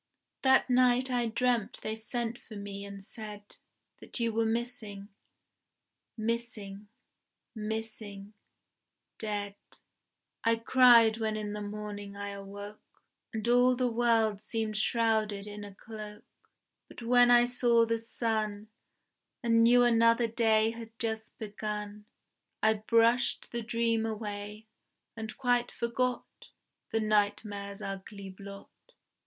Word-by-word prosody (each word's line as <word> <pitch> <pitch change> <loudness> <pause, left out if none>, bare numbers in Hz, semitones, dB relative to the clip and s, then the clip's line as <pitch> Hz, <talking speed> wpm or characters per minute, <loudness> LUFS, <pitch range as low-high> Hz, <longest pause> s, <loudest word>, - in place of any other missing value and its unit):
That 265 0 +5
night 255 0 +3
I 240 -1 +1
dreamt 235 -1 0
they 215 - -2
sent 230 +1 -4
for 220 - -12
me 200 -1 -6
and 200 -1 -9
said 210 -2 -9 0.4
That - - -6
you 230 -1 0
were 225 0 +1
missing, 220 -4 -3 1.1
"missing, 220 -3 -4 0.7
missing 215 -2 -6 0.9
dead": 205 -2 -3 0.9
I 230 0 +4
cried 230 -1 +6
when 220 -1 -1
in 210 -1 -4
the 210 - -5
morning 205 -1 -6
I 200 0 -5
awoke, 200 +1 -10 0.3
And 220 -1 -4
all 245 +1 +5
the 250 -1 0
world 225 -3 +2
seemed 215 0 -2
shrouded 215 -2 +1
in 210 0 -7
a 200 -1 -10
cloak; 210 0 -9 0.6
But - - -11
when 245 +1 +5
I 240 0 +7
saw 240 -1 +3
the 230 0 0
sun, 220 -2 -2 0.7
And 230 -1 +4
knew 245 +1 +6
another 230 0 +4
day 220 -1 +3
had 225 -1 -10
just 220 -1 -3
begun, 210 -1 -5 0.6
I 220 0 +5
brushed 230 +3 +2
the 235 - -2
dream 230 0 0
away, 210 -1 -5 0.5
and 220 -1 -7
quite 245 -2 +1
forgot 245 +1 -3 0.4
The 225 - 0
nightmare's 205 -1 0
ugly 195 0 -7
blot. 200 +1 -11
220 Hz, 120 wpm, -30 LUFS, 210-235 Hz, 1.1 s, I